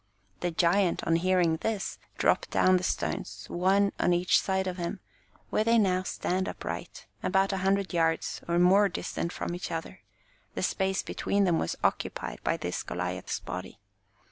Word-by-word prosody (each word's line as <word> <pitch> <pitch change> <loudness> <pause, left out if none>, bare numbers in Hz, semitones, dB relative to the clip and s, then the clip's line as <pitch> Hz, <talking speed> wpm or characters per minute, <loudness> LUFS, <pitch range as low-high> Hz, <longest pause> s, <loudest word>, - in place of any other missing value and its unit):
The 175 - -1
giant 175 +2 +2
on 165 - +3
hearing 175 -2 +2
this 215 +2 -3 0.2
dropped - - +2
down 185 0 +4
the 180 - -4
stones, - - -3
one 195 +3 +3
on 175 - +3
each 175 +1 +3
side 190 0 0
of 185 -1 -3
him, 175 +3 -3 0.5
where 215 - +2
they 230 +1 +4
now 185 -4 +3
stand 185 0 -2
upright, - - -6 0.2
about 195 0 +2
a - - 0
hundred 195 0 +1
yards 165 -1 0
or 170 0 +1
more 195 +3 +5
distant 170 -1 -3
from 175 - -4
each 175 - -4
other; 165 +3 -5 0.5
the - - -2
space 190 -1 0
between 200 0 0
them 175 -4 +3
was 80 - -1
occupied - - -1
by - - +1
this - - -3
Goliah's - - -3
body. - - -7
185 Hz, 170 wpm, -29 LUFS, 175-195 Hz, 0.5 s, more